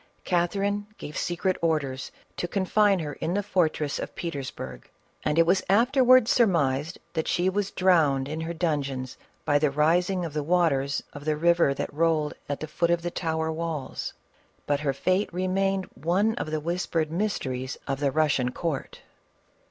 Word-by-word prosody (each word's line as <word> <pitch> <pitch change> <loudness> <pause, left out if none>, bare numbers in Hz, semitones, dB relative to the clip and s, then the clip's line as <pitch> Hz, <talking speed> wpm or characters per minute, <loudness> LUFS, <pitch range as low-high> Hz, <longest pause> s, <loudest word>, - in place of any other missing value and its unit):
Catherine 200 +3 0
gave 150 - -8
secret 175 +2 -1
orders 145 -6 -1 0.3
to 175 - -2
confine 200 +2 +2
her 150 -4 -4
in 170 +6 -3
the 205 - 0
fortress 160 -6 0
of - - -6
Petersburg, 135 - -6 0.3
and 150 +1 0
it 165 - +6
was 185 +2 +3
afterwards 255 +3 +5
surmised 160 - +2 0.2
that 160 -1 -1
she 180 +2 +1
was 200 0 -1
drowned 155 -8 +3
in 155 +2 -4
her 165 +1 -3
dungeon 145 -6 -1 0.4
by 145 0 +3
the 150 0 +3
rising 175 +5 +2
of 160 - -6
the 150 - -1
waters 145 -4 +1
of 145 - -9
the 155 -1 +1
river 170 -3 +3
that - - -4
rolled 155 -1 +1 0.2
at 145 - -3
the 155 - -4
foot 170 +2 0
of 170 -1 +1
the 175 - -2
tower 160 -2 -1
walls; 160 -4 -4 0.5
but 145 -1 +1
her 145 -2 0
futo 185 +9 0
remained 190 +2 0
one 190 +8 +1
of 220 - -4
the 155 0 -1
whispered 165 -1 -1
mysteries 135 -9 -2
of 135 -1 -2
the 145 -1 +2
Russian 145 -4 +2
court. 155 -1 -4
165 Hz, 165 wpm, -26 LUFS, 145-185 Hz, 0.5 s, it